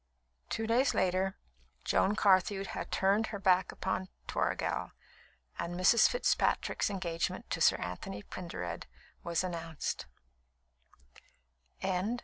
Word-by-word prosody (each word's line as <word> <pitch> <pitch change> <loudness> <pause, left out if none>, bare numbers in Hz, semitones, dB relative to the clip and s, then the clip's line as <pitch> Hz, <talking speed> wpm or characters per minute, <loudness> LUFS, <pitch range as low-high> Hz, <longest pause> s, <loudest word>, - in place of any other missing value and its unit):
Two 225 - -1
days 250 +4 +3
later, 190 +1 +1 0.5
Joan 205 - +2
Carthew 195 -1 +3
had 195 - -5
turned 200 +3 +2
her 205 - -4
back 190 -2 +3
upon 190 0 -2 0.2
Toragel, - - -1 0.7
and 170 +1 -3
Mrs. 185 +5 +6
Fitzpatrick's - - +1
engagement 175 -4 -3
to - - -1
Sir - - +6
Anthony 95 +3 -5
Pendered 90 - -6 0.4
was 170 0 0
announced. 165 -3 -4
185 Hz, 105 wpm, -32 LUFS, 170-200 Hz, 0.7 s, Mrs